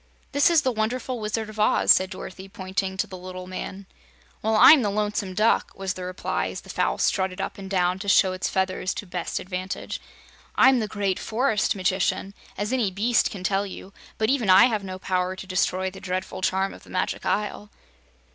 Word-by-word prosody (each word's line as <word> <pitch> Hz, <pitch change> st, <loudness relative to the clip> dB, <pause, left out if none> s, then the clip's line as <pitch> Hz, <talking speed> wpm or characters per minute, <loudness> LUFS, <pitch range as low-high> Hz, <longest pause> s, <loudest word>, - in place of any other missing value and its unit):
"This 285 Hz, +3 st, +4 dB
is 330 Hz, -3 st, +4 dB
the 260 Hz, -, +2 dB
Wonderful 245 Hz, +3 st, -2 dB
Wizard 215 Hz, +1 st, -2 dB
of 215 Hz, 0 st, -10 dB
Oz," 210 Hz, -, +4 dB
said 185 Hz, 0 st, +4 dB
Dorothy, 190 Hz, 0 st, -9 dB
pointing 190 Hz, -1 st, -3 dB
to -, -, +1 dB
the 185 Hz, -, -9 dB
little 185 Hz, 0 st, -8 dB
man. 185 Hz, +1 st, -6 dB, 0.6 s
"Well, 220 Hz, +1 st, +1 dB
I'm 285 Hz, +6 st, +9 dB
the 210 Hz, -, 0 dB
Lonesome 205 Hz, -2 st, -2 dB
Duck," 215 Hz, +3 st, +2 dB
was 195 Hz, -1 st, -3 dB
the 185 Hz, -, -7 dB
reply, 185 Hz, +1 st, -2 dB
as -, -, -6 dB
the -, -, -10 dB
fowl -, -, 0 dB
strutted 190 Hz, -1 st, 0 dB
up 195 Hz, -, -4 dB
and 195 Hz, -1 st, -8 dB
down 180 Hz, -1 st, +1 dB
to 200 Hz, -, -7 dB
show 190 Hz, -1 st, +5 dB
its 185 Hz, -, -2 dB
feathers 190 Hz, 0 st, -1 dB
to -, -, -5 dB
best 180 Hz, -2 st, -3 dB
advantage. 185 Hz, 0 st, -5 dB, 0.5 s
"I'm 260 Hz, -1 st, +6 dB
the 215 Hz, -, -1 dB
great 200 Hz, -3 st, -1 dB
Forest 220 Hz, -2 st, 0 dB
Magician, 190 Hz, 0 st, 0 dB, 0.2 s
as 210 Hz, +4 st, -2 dB
any 240 Hz, -6 st, +1 dB
beast 215 Hz, +5 st, +2 dB
can 195 Hz, -5 st, -8 dB
tell 195 Hz, +1 st, 0 dB
you, 195 Hz, 0 st, -10 dB, 0.2 s
but 220 Hz, +2 st, +1 dB
even 245 Hz, -8 st, 0 dB
I 185 Hz, +1 st, +8 dB
have 220 Hz, -5 st, 0 dB
no 185 Hz, -1 st, -6 dB
power 185 Hz, 0 st, -1 dB
to 190 Hz, -, -8 dB
destroy 185 Hz, 0 st, 0 dB
the 190 Hz, 0 st, -12 dB
dreadful 185 Hz, 0 st, -4 dB
charm 190 Hz, +1 st, 0 dB
of -, -, -13 dB
the -, -, -18 dB
Magic -, -, -2 dB
Isle." 210 Hz, 0 st, -2 dB
195 Hz, 205 wpm, -25 LUFS, 185-215 Hz, 0.6 s, I'm